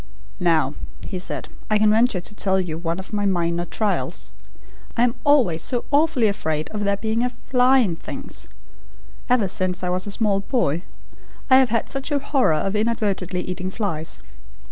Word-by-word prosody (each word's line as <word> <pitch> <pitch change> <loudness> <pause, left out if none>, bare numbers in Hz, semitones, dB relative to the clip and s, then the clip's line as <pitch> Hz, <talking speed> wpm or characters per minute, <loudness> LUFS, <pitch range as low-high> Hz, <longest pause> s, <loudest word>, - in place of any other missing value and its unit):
"Now," 160 -5 +2 0.3
he 185 - -4
said, 180 - -3 0.2
"I 215 - +4
can 210 0 +4
venture 225 -2 +3
to 175 - -10
tell 190 -2 +1
you 175 -4 -2
one 165 +1 -2
of 190 +3 -9
my 205 -1 +1
minor 175 -2 0
trials. 210 +3 -2 0.7
I 235 - +4
am 245 -1 +3
always 245 - +3
so 245 +4 0
awfully 290 -5 +3
afraid 155 -7 -2
of 210 -1 -3
there 200 0 +1
being 220 +3 -1
a 250 - +1
FLY 250 +1 +3
in 195 -10 +2
things. - - -8 0.8
Ever 245 -5 +3
since 185 0 -2
I 180 - 0
was 185 +2 -1
a - - -4
small 205 -2 +1
boy 195 - 0 0.7
I 260 - +9
have 265 -2 +4
had 230 0 0
such 270 +1 -2
a 290 - +3
horror 270 - +2
of 195 +6 -1
inadvertently 205 -5 0
eating 180 +1 -4
flies. 165 - -3
200 Hz, 180 wpm, -22 LUFS, 180-235 Hz, 0.8 s, I